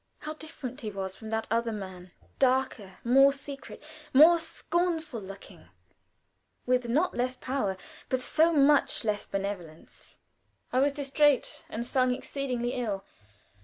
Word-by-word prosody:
How 305 - -5
different 300 -4 -8
he 220 - -4
was 190 -2 -5
from 220 - -9
that 220 0 -1
other 230 0 +1
man; 185 -4 -7 0.3
darker, 255 -7 +1
more 270 +3 +6
secret, 275 +1 -8 0.3
more 330 +5 +8
scornful 330 -7 -2
looking, 195 0 -11 1.0
with 250 -1 +1
not 310 +9 +1
less 255 +1 -1
power, 250 -7 -2 0.3
but 260 - +1
so 320 +6 +3
much 290 -3 +4
less 210 -1 -1
benevolence. 195 -5 -6 0.6
I 255 - +3
was 285 +2 +3
distrait, 285 0 +1
and 235 +2 -4
sung 255 0 +2
exceedingly 250 -2 -3
ill. 210 -6 -3
255 Hz, 130 wpm, -29 LUFS, 215-280 Hz, 1.0 s, more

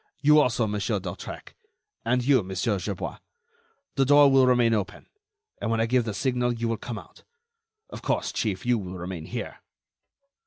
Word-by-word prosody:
You 150 +1 +6
also, 125 -5 +2
Monsieur 105 +1 -1
d'Hautrec, 90 -2 -8 0.5
and 125 +2 +1
you, 135 -3 +5
Monsieur 95 +2 -1
Gerbois. 100 0 -5 0.7
The 135 - +2
door 145 +1 +6
will 135 -1 +5
remain 120 -2 +4
open, 100 -3 -3 0.6
and - - -1
when 115 0 +1
I 115 - +3
give 125 0 +2
the 110 - -3
signal, 125 0 0
you 115 0 -2
will 115 -1 -1
come 120 0 -6
out. - - -13 0.7
Of - - -8
course, - - -1
Chief, 100 -3 -2
you 120 -1 +2
will 95 -2 -7
remain 90 -2 -6
here." - - -6
115 Hz, 170 wpm, -26 LUFS, 100-125 Hz, 0.7 s, You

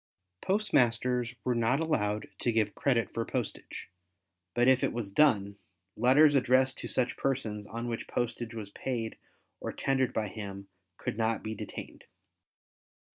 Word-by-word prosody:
Postmasters 125 - +2
were 125 - +1
not 120 +3 +2
allowed 110 -10 0
to 120 - +1
give 110 -2 +1
credit 125 -5 +1
for 115 - -1
postage, - - -4 0.7
but 120 +1 +4
if 130 -1 +5
it - - +1
was 115 -4 -4
done, 100 -5 +3 0.4
letters 135 +6 +6
addressed 130 0 +3
to - - -4
such 125 -1 0
persons 110 -6 -2
on 115 +2 -5
which 115 -1 -4
postage 120 -1 -3
was 105 -3 -6
paid 115 -2 -3 0.4
or - - -4
tendered 135 -1 +1
by 110 -1 -1
him 100 -1 -7 0.3
could 110 - -4
not 115 0 +1
be 110 - -3
detained. - - -8
120 Hz, 145 wpm, -30 LUFS, 110-130 Hz, 0.7 s, letters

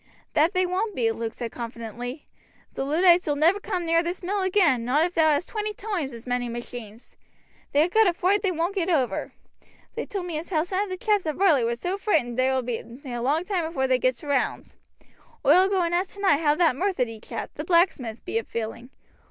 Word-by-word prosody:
"That 320 +6 +3
they 370 -1 +2
won't 380 +4 -2
be," 230 -2 +1
Luke 225 0 -4
said 235 -2 -5
confidently; 240 +3 -7 0.5
"the - - -3
Luddites 345 +5 +4
ull 295 - +1
never 330 +7 +3
come 375 -4 -3
near 330 0 +3
this 350 +2 -4
mill 395 +3 -1
agin, 360 - +3
not 280 +7 +2
if 355 - -4
thou 320 -2 +4
hast 295 +3 +1
twenty 425 -1 -3
toimes 385 -10 -3
as 235 -1 -10
many 245 -1 -1
machines. 235 -1 -8 0.6
They 295 +2 +4
ha' - - -3
got 440 0 +5
a 355 - +3
froight 380 +4 +2
they 395 - +1
won't 340 +3 -1
get 370 -3 -1
over. 275 -8 0 0.6
They - - -4
told 390 -3 -4
me 330 -4 -3
as 330 - -9
how 315 -4 +1
some 375 +3 -1
of - - -10
the 370 - -4
chaps 415 -4 +1
at 305 - -1
Varley 330 -10 +4
was 235 +1 -1
so 370 +7 -2
freighted 320 - +1
that - - -6
they 255 +1 +3
will 260 -1 0
be 240 -2 -3
a 245 0 -8
long 300 +8 +1
toime 370 -3 -1
afore 320 -5 -1
they 260 -1 +2
gets 255 0 0
round. 285 -2 -1 0.7
Oi'll 375 +2 +6
go 380 -2 +2
and 340 0 -1
ask 370 +3 -1
tonight 395 -7 +3
how 300 -2 +3
that 325 -5 +3
Methurdy 255 - -1
chap, - - -6
the 300 - -5
blacksmith, 315 - +1
be 225 - 0
a - - -6
feeling. 230 +2 -5
320 Hz, 225 wpm, -25 LUFS, 250-370 Hz, 0.7 s, Oi'll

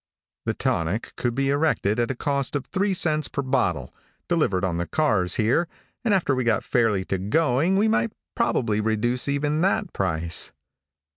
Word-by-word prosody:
The - - -1
tonic 85 +7 -1
could 120 -1 -2
be 135 +1 +1
erected 140 -8 +1
at 120 - +1
a 135 - -2
cost 140 +2 -1
of 140 - -2
three 195 0 0
cents 155 -3 +2
per 140 - -3
bottle, 95 - 0 0.3
delivered 105 - +1
on 85 -2 -1
the 85 0 -2
cars 105 -13 +1
here, 120 +10 +2 0.4
and 230 - +1
after 185 -8 +2
we 130 -1 0
got 115 -3 +1
fairly 110 -6 +1
to 95 - -2
going 150 - +2
we 210 +2 +3
might 225 0 +1 0.2
probably 115 - +1
reduce 110 +4 0
even 145 +2 0
that 195 +1 0
price. 85 -3 -1
125 Hz, 170 wpm, -24 LUFS, 105-155 Hz, 0.4 s, we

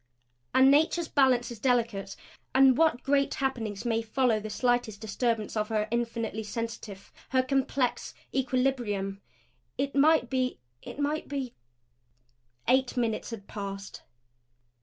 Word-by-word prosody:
And 265 +1 +7
Nature's 320 +3 +3
balance 260 -5 +3
is 235 - -8
delicate; 230 -6 0 0.4
and 265 -1 +7
what 315 -4 +2
great 275 0 +2
happenings 230 -6 -2
may 230 -1 +1
follow 230 0 +1
the 215 +1 -6
slightest 245 -2 0
disturbance 220 0 -1
of 215 -1 0
her 215 -1 0
infinitely 230 -2 -2
sensitive, 220 -2 -6 0.2
her 260 -1 +3
complex, 265 -1 -1 0.2
equilibrium? 245 -7 0 0.6
It 275 0 -1
might 300 -1 +4
be 255 0 -1 0.2
it - - -9
might 295 +2 -1
be 270 -4 -4 1.1
Eight 260 +1 +2
minutes 230 -3 -1
had 225 -4 -7
passed. 195 -1 -6
245 Hz, 125 wpm, -28 LUFS, 220-265 Hz, 1.1 s, And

